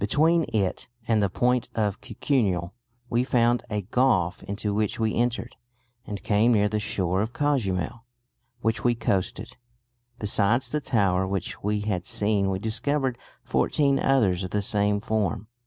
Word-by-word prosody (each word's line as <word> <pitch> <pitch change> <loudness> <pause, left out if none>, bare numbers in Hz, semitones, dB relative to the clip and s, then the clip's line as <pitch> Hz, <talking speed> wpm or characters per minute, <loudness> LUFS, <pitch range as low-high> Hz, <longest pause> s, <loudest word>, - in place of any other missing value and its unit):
Between 160 +10 +3
it 100 -4 -1 0.2
and 110 -2 +3
the 100 - +2
point 125 +4 +1
of 105 -3 -1
Cucuniel 100 -10 -1 0.3
we 120 +1 +1
found 120 -2 +2
a 105 -2 -2
gulf 95 -6 +1
into 100 +1 -3
which 105 +1 -1
we 110 -1 +1
entered, 120 0 -1 0.5
and 100 -2 -6
came 105 +3 +3
near 105 -2 +3
the 105 +1 -1
shore 95 -3 -1
of 110 +3 -3
Cuzamil, 115 - -1 0.6
which 115 -1 -1
we 120 -1 +3
coasted. 95 -3 -2 0.6
Besides 110 +3 +2
the 150 - -2
tower 95 -7 +1
which 95 -2 -4
we 105 +1 -1
had 100 -2 -2
seen 105 -4 +1
we 95 - -1
discovered 130 +5 -1 0.2
fourteen 140 -2 +1
others 105 -10 +2
of 95 - -4
the 105 +1 -1
same 105 0 +1
form." 105 -1 -2
105 Hz, 155 wpm, -25 LUFS, 100-120 Hz, 0.6 s, Between